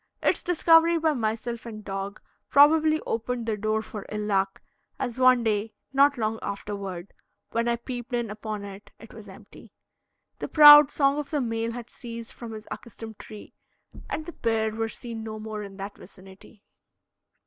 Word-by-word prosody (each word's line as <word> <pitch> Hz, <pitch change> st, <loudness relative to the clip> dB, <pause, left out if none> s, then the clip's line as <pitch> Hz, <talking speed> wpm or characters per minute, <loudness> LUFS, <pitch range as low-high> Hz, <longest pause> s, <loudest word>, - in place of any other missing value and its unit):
Its -, -, +2 dB
discovery 335 Hz, -1 st, +4 dB
by 320 Hz, -1 st, +1 dB
myself 230 Hz, -1 st, -3 dB
and 215 Hz, -2 st, -9 dB
dog 195 Hz, +1 st, -5 dB, 0.3 s
probably 310 Hz, +2 st, +5 dB
opened 235 Hz, +1 st, -3 dB
the 225 Hz, -2 st, -1 dB
door 215 Hz, +1 st, -1 dB
for 215 Hz, -2 st, -8 dB
ill 210 Hz, 0 st, -3 dB
luck, 195 Hz, -2 st, 0 dB, 0.4 s
as 245 Hz, -3 st, -3 dB
one 255 Hz, -2 st, +5 dB
day, 215 Hz, 0 st, -1 dB, 0.2 s
not 280 Hz, 0 st, +4 dB
long 220 Hz, -1 st, -1 dB
afterward, 200 Hz, -3 st, -6 dB, 0.4 s
when 230 Hz, +1 st, 0 dB
I 235 Hz, -, +2 dB
peeped 245 Hz, +1 st, -7 dB
in 240 Hz, -3 st, -2 dB
upon 215 Hz, -1 st, -6 dB
it, 200 Hz, 0 st, -11 dB
it 225 Hz, -, -14 dB
was 215 Hz, -2 st, -12 dB
empty. 190 Hz, -, -15 dB, 0.7 s
The -, -, -4 dB
proud 295 Hz, -1 st, +9 dB
song 280 Hz, 0 st, +1 dB
of 290 Hz, -1 st, -5 dB
the 300 Hz, -, -1 dB
male 230 Hz, -2 st, -2 dB
had 240 Hz, -1 st, -8 dB
ceased 230 Hz, -2 st, -8 dB
from 230 Hz, -2 st, -9 dB
his 215 Hz, 0 st, -9 dB
accustomed 225 Hz, -3 st, -9 dB
tree, 215 Hz, -1 st, -11 dB, 0.6 s
and 315 Hz, -, -4 dB
the 345 Hz, -, -8 dB
pair 220 Hz, -1 st, 0 dB
were 225 Hz, +1 st, -3 dB
seen 230 Hz, 0 st, -7 dB
no 220 Hz, -1 st, -6 dB
more 215 Hz, 0 st, -6 dB
in 200 Hz, -1 st, -9 dB
that 200 Hz, +1 st, -7 dB
vicinity. 190 Hz, +2 st, -16 dB
225 Hz, 170 wpm, -26 LUFS, 210-255 Hz, 0.7 s, proud